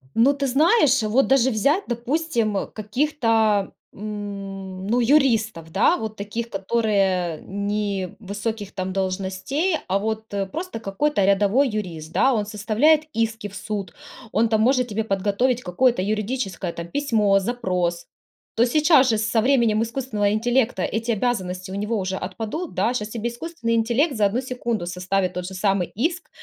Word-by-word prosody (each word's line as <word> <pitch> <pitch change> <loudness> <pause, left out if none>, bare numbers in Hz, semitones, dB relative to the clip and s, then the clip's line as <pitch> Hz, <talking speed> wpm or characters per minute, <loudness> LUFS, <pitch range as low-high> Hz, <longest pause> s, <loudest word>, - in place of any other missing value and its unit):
Ну, 260 +5 +5
ты, 280 -1 -2
знаешь, 290 - +4
вот, 235 +6 +2
даже 265 -1 +4
взять, 280 - +2
допустим, 240 -4 -1
каких-то, 225 -3 +1 0.2
м, 195 -2 -6
ну, 240 +3 +2
юристов, 225 - +2
да, 195 - +3
вот 220 -1 -5
таких, 225 +3 -5
которые 195 -5 0
не 200 -1 -3
высоких, 205 0 -4
там, 185 -1 -3
должностей, 195 - -1
а, 195 +1 +1
вот, 220 0 -4
э, 200 -1 0
просто, 330 - -5
какой-то 205 +3 0
рядовой 205 +7 +3
юрист, 170 -7 -5
да. 265 0 +4
Он 210 -2 0
составляет 225 +10 +2
иски 225 -1 -1
в 200 - -12
суд, 200 -5 -5 0.4
он, 225 +2 +3
там, 220 -1 +2
может 250 +1 +3
тебе 220 0 -2
подготовить 210 +5 0
какое-то 235 +5 +2
юридическое, 210 -3 -2
там, 170 0 -6
письмо, 215 -7 +2
запрос. 180 -6 -1 0.5
То, 235 - +5
сейчас 295 0 +4
же, 220 - +2
со 220 +1 +1
временем 230 -4 +3
искусственного 230 -4 -1
интеллекта, 235 -1 +1
эти 230 +2 -1
обязанности 190 -5 -2
у - - -5
него 210 +3 -1
уже 190 0 -2
отпадут, 225 - -5
да. 240 - +1
Щас 210 -3 -3
тебе 230 +1 -3
искусственный 240 -2 -4
интеллект 240 +7 +1
за 210 -2 +3
одну 215 +5 -1
секунду 240 -7 -3
составит 185 +1 -1
тот 180 0 -4
же 190 - -7
самый 195 -2 +1
иск, 330 - -2
220 Hz, 155 wpm, -23 LUFS, 195-245 Hz, 0.5 s, Ну